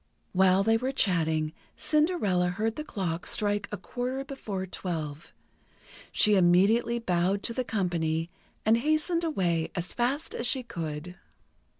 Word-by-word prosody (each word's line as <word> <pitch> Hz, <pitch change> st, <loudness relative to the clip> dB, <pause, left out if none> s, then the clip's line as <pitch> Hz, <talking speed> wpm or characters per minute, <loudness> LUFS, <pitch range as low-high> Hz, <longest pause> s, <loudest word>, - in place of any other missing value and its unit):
While 190 Hz, +1 st, +4 dB
they 225 Hz, +2 st, +3 dB
were 255 Hz, +3 st, -2 dB
chatting, 160 Hz, -, +1 dB, 0.2 s
Cinderella 300 Hz, -, +2 dB
heard 215 Hz, +5 st, -1 dB
the 305 Hz, -, -4 dB
clock 180 Hz, -, -3 dB
strike 205 Hz, -1 st, +1 dB
a 210 Hz, -, -3 dB
quarter 255 Hz, +4 st, -4 dB
before 210 Hz, -9 st, -5 dB
twelve. 160 Hz, -5 st, -5 dB, 0.8 s
She 210 Hz, -, +4 dB
immediately 200 Hz, +6 st, +4 dB
bowed 190 Hz, -2 st, 0 dB
to 230 Hz, -, -2 dB
the 255 Hz, -, -1 dB
company, 170 Hz, -7 st, -1 dB, 0.3 s
and 220 Hz, +1 st, +5 dB
hastened 310 Hz, +6 st, +1 dB
away 175 Hz, -, 0 dB
as 175 Hz, -1 st, -3 dB
fast 265 Hz, +6 st, -1 dB
as 235 Hz, -, -2 dB
she 255 Hz, +3 st, 0 dB
could. 165 Hz, -4 st, -6 dB
200 Hz, 135 wpm, -28 LUFS, 175-240 Hz, 0.8 s, and